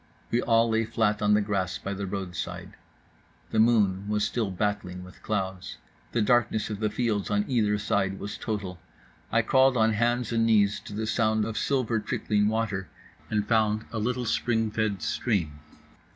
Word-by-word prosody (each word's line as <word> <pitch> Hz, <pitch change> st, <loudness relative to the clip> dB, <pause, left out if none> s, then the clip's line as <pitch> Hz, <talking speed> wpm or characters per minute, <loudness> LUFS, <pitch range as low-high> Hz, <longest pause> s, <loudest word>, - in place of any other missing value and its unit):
We 120 Hz, -, +2 dB
all 115 Hz, 0 st, +3 dB
lay 110 Hz, 0 st, +1 dB
flat 110 Hz, -2 st, 0 dB
on 105 Hz, 0 st, +4 dB
the 105 Hz, -, +3 dB
grass 95 Hz, -3 st, -1 dB
by 100 Hz, -, -5 dB
the 100 Hz, 0 st, -4 dB
roadside. 95 Hz, -2 st, -5 dB, 0.8 s
The 110 Hz, -, +1 dB
moon 105 Hz, -4 st, +3 dB
was 105 Hz, -1 st, +1 dB
still 115 Hz, -5 st, -1 dB
battling 95 Hz, -2 st, -2 dB
with 90 Hz, +1 st, -14 dB
clouds. 95 Hz, -3 st, -3 dB, 0.3 s
The 115 Hz, -, +1 dB
darkness 120 Hz, -2 st, +2 dB
of 105 Hz, -, -4 dB
the 110 Hz, -1 st, 0 dB
fields 105 Hz, -3 st, -1 dB
on 105 Hz, 0 st, +1 dB
either 105 Hz, -5 st, +2 dB
side 95 Hz, -2 st, 0 dB
was 100 Hz, -, -6 dB
total. 100 Hz, -5 st, -4 dB, 0.5 s
I 115 Hz, +1 st, +3 dB
crawled 130 Hz, +2 st, +4 dB
on 110 Hz, 0 st, +3 dB
hands 120 Hz, +2 st, 0 dB
and 115 Hz, -1 st, +2 dB
knees 105 Hz, -3 st, +3 dB
to -, -, -8 dB
the 110 Hz, +2 st, -2 dB
sound 110 Hz, -1 st, +1 dB
of 110 Hz, 0 st, -4 dB
silver 125 Hz, -4 st, 0 dB
trickling 105 Hz, 0 st, 0 dB
water 105 Hz, -4 st, -1 dB, 0.4 s
and 105 Hz, -1 st, 0 dB
found 110 Hz, -1 st, +2 dB
a 115 Hz, -, -3 dB
little 125 Hz, +3 st, -1 dB
spring 115 Hz, -1 st, 0 dB
fed 105 Hz, -5 st, -1 dB
stream. 80 Hz, -, -1 dB
105 Hz, 175 wpm, -27 LUFS, 100-115 Hz, 0.8 s, on